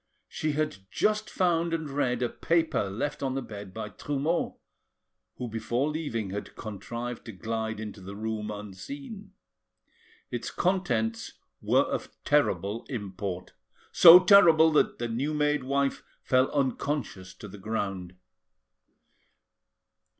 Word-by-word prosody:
She 155 -1 -2
had 155 -6 -1
just 215 0 0
found 170 -2 +1
and 160 -2 -4
read 130 -3 0
a 120 - 0
paper 165 -11 0
left 145 +10 -3
on 135 -1 -1
the 135 - -1
bed 100 -4 -9
by 110 +2 -6
Trumeau, 145 +8 -2 0.8
who 125 - -5
before 120 +5 -1
leaving 115 -11 -3
had 100 +1 -6
contrived 115 +3 -6
to 115 - -7
glide 110 +2 -3
into 105 -2 -7
the 100 +2 -8
room 110 0 -3
unseen. 135 - -8 1.0
Its 120 - -3
contents 120 -12 -1 0.3
were - - +3
of - - -4
terrible 105 +4 +1
import, 100 -6 -5 0.4
so 170 0 +11
terrible 170 -5 +7
that 150 - +2
the 120 - -2
new 135 +7 -2
made 150 -2 +1
wife 140 +1 0 0.2
fell 130 0 +3
unconscious 130 -8 -2
to 105 - -10
the 100 +1 -11
ground. 95 -4 -3
120 Hz, 130 wpm, -28 LUFS, 105-150 Hz, 1.0 s, so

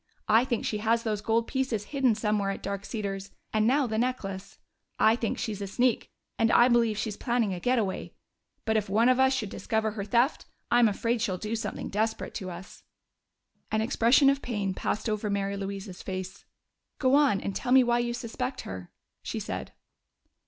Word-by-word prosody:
I 225 +3 +5
think 240 -3 -1
she 210 - -1
has 230 +2 +1
those 215 -2 -1
gold 225 +2 +1
pieces 260 -6 -1
hidden 260 -5 +3
somewhere 210 -2 0
at 195 - -4
Dark 200 0 -4
Cedars 195 -3 -4 0.2
and 215 0 +3
now 275 +3 +3
the 220 -2 -1
necklace. 200 -6 -3 0.4
I 220 +1 +5
think 230 -2 -2
she's 215 -4 -4
a 200 - -3
sneak, 245 +4 +1 0.3
and 225 0 +3
I 240 +1 +6
believe 230 -3 +3
she's 215 -1 -2
planning 235 -4 0
a 180 - -4
getaway. 225 -3 -1 0.5
But 220 0 +2
if 205 -2 -1
one 225 +5 +4
of 255 0 +3
us 265 0 +5
should 245 -6 -1
discover 220 -1 -1
her 205 -1 -4
theft, 235 +7 +1 0.3
I'm 240 -1 +6
afraid 230 +3 0
she'd 190 -5 -1
do 215 +1 -2
something 225 - -4
desperate 220 +2 -1
to 190 -4 -5
us." 175 +2 -10 0.9
An 220 - +1
expression 240 +5 +4
of 275 0 -2
pain 205 -5 -2
passed 215 +4 -2
over 215 -1 -1
Mary 200 0 -1
Louise's 195 -1 -6
face. 185 0 -6 0.5
"Go 260 -1 +2
on, 280 -8 +4
and 195 - -4
tell 250 - -3
me 260 0 +7
why 240 0 +2
you 240 0 -1
suspect 250 +2 -4
her," 95 -2 -8 0.3
she - - -4
said. - - -5
220 Hz, 190 wpm, -28 LUFS, 200-240 Hz, 0.9 s, me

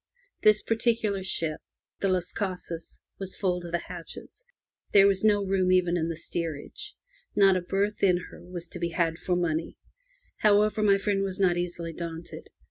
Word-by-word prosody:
This 215 -1 +5
particular 225 -3 +1
ship, 165 -4 -1 0.4
the 195 - +1
Las 180 -1 -1
CasaSy 180 -4 -5 0.2
was 190 -1 -5
full 180 -3 0
to 175 - -7
the 170 0 -1
hatches; 175 - -9 0.5
there 195 -1 +8
was 195 -1 +3
no 205 -2 +4
room 190 -1 +2
even 180 -1 +3
in 165 -1 0
the 165 - -2
steerage. 165 -2 -5 0.4
Not 195 -2 +6
a 185 - +1
berth 200 +4 -1
in 180 -2 +5
her - - -12
was 175 -1 -7
to 180 - -7
be 170 0 -1
had 165 -1 0
for 180 - 0
money. 165 -2 -1 0.6
However, 210 0 +4
my 200 -2 +5
friend 195 0 0
was 195 -1 -2
not 185 -3 +4
easily 175 -1 -3
daunted. 165 0 -7
185 Hz, 175 wpm, -28 LUFS, 170-200 Hz, 0.6 s, there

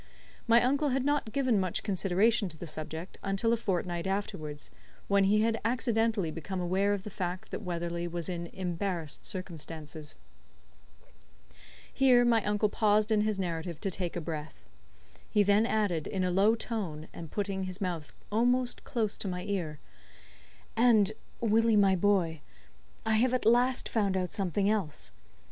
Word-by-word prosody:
My 230 +1 +6
uncle 280 +4 +2
had 265 0 0
not 290 -6 0
given 255 -4 +2
much 185 -2 -1
consideration 200 +2 +2
to 160 - -11
the 170 - -7
subject 160 +3 -6
until 195 +4 +1
a - - +4
fortnight 180 -5 -2
afterwards, 155 -7 -4 0.4
when 200 -1 +4
he 210 +2 +4
had 225 0 +1
accidently 225 -6 +1
become 175 +4 -5
aware 190 +3 +1
of 200 -2 -3
the 210 - -7
fact 180 -2 -4
that - - -4
Weatherley 170 -1 -3
was 170 -1 -4
in 170 -2 -4
embarrassed 175 -3 -4
circumstances. 160 -4 -5 1.8
Here 250 -2 +5
my 230 -3 +3
uncle 210 +1 +2
paused 210 0 +2
in 215 -1 +4
his 210 -2 0
narrative 170 -2 -3
to 195 - -1
take 180 -1 -2
breath. 155 - -6 0.6
He 210 - +4
then 205 +3 +4
added, 200 -9 0
in 190 -2 -1
a 180 - +1
low 200 +5 +4
tone, 190 -10 -4
and 165 -2 -8
putting 195 0 -2
his 185 +1 -6
mouth 175 -6 -3 0.2
almost 245 +3 +1
close 220 -3 -1
to - - -4
my 180 -1 -3
ear: 180 -7 -3 1.0
"And, 220 -4 +5 0.3
Willie, 225 0 +3
my 195 -2 +5
boy, 175 -5 +1 0.6
I 220 0 +3
have 255 +3 +3
at 250 - -2
last 245 +3 +3
found 200 -4 +1
out 180 -1 -2
something 195 0 0
else. 155 - -1
195 Hz, 160 wpm, -30 LUFS, 175-220 Hz, 1.8 s, My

